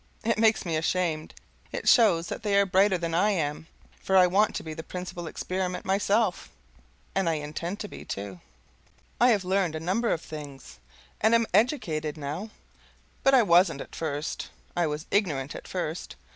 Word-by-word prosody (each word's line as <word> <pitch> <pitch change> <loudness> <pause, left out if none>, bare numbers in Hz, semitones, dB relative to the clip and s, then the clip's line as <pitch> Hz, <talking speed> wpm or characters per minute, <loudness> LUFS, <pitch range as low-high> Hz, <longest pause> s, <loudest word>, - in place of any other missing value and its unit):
It 225 -1 +1
makes 220 -2 +3
me 165 -2 -1
ashamed. 160 -1 -1 0.4
It - - -5
shows 195 -9 +5
that - - -5
they 205 -2 +1
are 200 - +4
brighter 190 0 +3
than 170 -1 -3
I 190 +5 +3
am, 160 -5 -2 0.3
for 190 - +2
I 185 - +8
want 200 +4 +2
to - - -3
be 160 - -6
the 160 - -6
principal 175 0 -6
Experiment 185 +2 -3
myself 200 +3 +1 0.6
and 190 -3 +1
I - - +1
intend 155 +6 -4
to 210 - -4
be, - - -10
too. 100 -2 -6 0.8
I 245 - +6
have 205 -6 +2
learned 185 -3 +1
a - - -3
number 195 +8 0
of 165 - 0
things, 145 - -9 0.4
and 220 +2 +5
am 230 0 +3
educated, 160 - +1
now, 155 +9 -5 0.7
but 270 0 +5
I 250 - +6
wasn't 175 -5 +4
at - - -9
first. 150 -1 -4 0.3
I 175 -2 +2
was 150 +2 -4
ignorant 150 -10 0
at - - -9
first. 175 -2 -4
180 Hz, 180 wpm, -27 LUFS, 155-205 Hz, 0.8 s, I